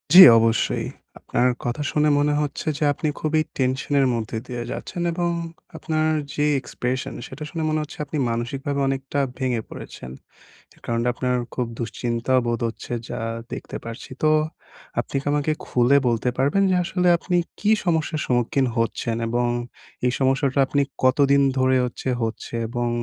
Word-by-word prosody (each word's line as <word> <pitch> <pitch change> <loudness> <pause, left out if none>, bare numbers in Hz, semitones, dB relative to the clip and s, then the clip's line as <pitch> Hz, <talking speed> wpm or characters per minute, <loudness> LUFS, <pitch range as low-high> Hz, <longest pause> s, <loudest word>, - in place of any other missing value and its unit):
জি 185 - +13 0.2
অবশ্যই 115 0 +1 0.3
আপনার 125 - +1 0.2
কথা 120 +4 -2
শুনে 150 0 +3
মনে 145 0 +2
হচ্ছে 150 +1 -4
যে 150 - -2
আপনি 155 - -3
খুবই 155 0 +1 0.2
টেনশনের 135 +1 +1
মধ্যে 115 -1 -3
দিয়ে 120 -1 -4
যাচ্ছেন 175 - -5
এবং 175 0 0 0.5
আপনার 155 0 0 0.2
যে 150 - +1 0.2
এক্সপ্রেশন 130 +1 -3
সেটা 150 +4 -8
শুনে 165 0 -3
মনে 155 0 +1
হচ্ছে 150 +3 -8
আপনি 150 +2 -4
মানসিকভাবে 135 +5 -2
অনেকটা 135 +1 -2 0.2
ভেঙে 125 -4 0
পড়েছেন। 65 - -9 0.7
কারণ 115 0 0
আপনার 125 +1 0 0.2
খুব 125 - 0
দুশ্চিন্তা 120 +1 -2
বোধ 120 -1 0
হচ্ছে 115 +2 -6 0.2
যা - - -4 0.3
দেখতে - - -6
পারছি। 115 0 -7
তো 155 - +5 0.7
আপনি - - -4
কি - - -19
আমাকে 150 +1 +1
খুলে 125 +3 +4
বলতে 120 +1 +1
পারবেন 145 +9 +3
যে 185 - +3
আসলে 180 0 0
আপনি 180 +1 -1 0.2
কি 210 - +2
সমস্যার 160 -2 0
সম্মুখীন 125 +2 +1
হচ্ছেন 115 0 0
এবং 120 +1 +1 0.6
এই 125 - +2
সমস্যাটা 135 +1 +2
আপনি 140 +1 +1 0.2
কতদিন 140 +2 +4 0.2
ধরে 130 0 +4
হচ্ছে 125 +1 -4
হচ্ছে 115 +1 -4
এবং 120 +1 -1
130 Hz, 155 wpm, -23 LUFS, 120-150 Hz, 0.7 s, জি